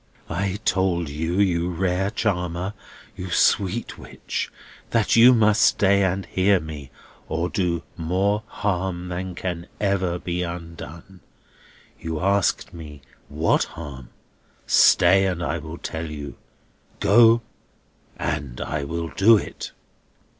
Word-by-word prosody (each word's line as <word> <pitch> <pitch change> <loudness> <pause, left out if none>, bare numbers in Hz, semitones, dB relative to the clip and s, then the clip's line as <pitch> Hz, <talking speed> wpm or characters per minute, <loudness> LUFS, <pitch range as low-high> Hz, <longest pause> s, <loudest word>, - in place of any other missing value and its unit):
"I 95 +3 -1
told 90 -4 +1
you, 80 +6 -2
you 90 -3 +2
rare 90 +2 0
charmer, 95 -4 -2 0.4
you 90 0 -6
sweet 100 +5 +1
witch, - - -5 0.4
that 115 -3 +2
you 120 +2 +8
must 110 -2 +4
stay 100 0 +4
and 95 +1 0
hear 95 +1 +2
me, 75 -5 -8 0.4
or 85 +2 -1
do 90 -4 -1
more 95 +5 0
harm 95 -4 -2
than 90 0 -4
can 85 -2 -4
ever 95 -4 0
be 90 0 -3
undone. 85 +1 -8 0.8
You 80 -1 -4
asked 100 +1 +1
me 75 -4 -10 0.3
what - - +1
harm. 65 -4 -8 0.6
Stay, 95 +2 +5
and 90 -2 -2
I 85 0 -2
will 80 +2 -8
tell 80 -1 -5
you. 70 -4 -7 0.6
Go, 115 +2 +5 0.7
and 70 -4 -3
I 75 -2 -3
will 85 +3 -4
do 110 +6 +5
it!" - - -6
90 Hz, 125 wpm, -23 LUFS, 85-100 Hz, 0.8 s, you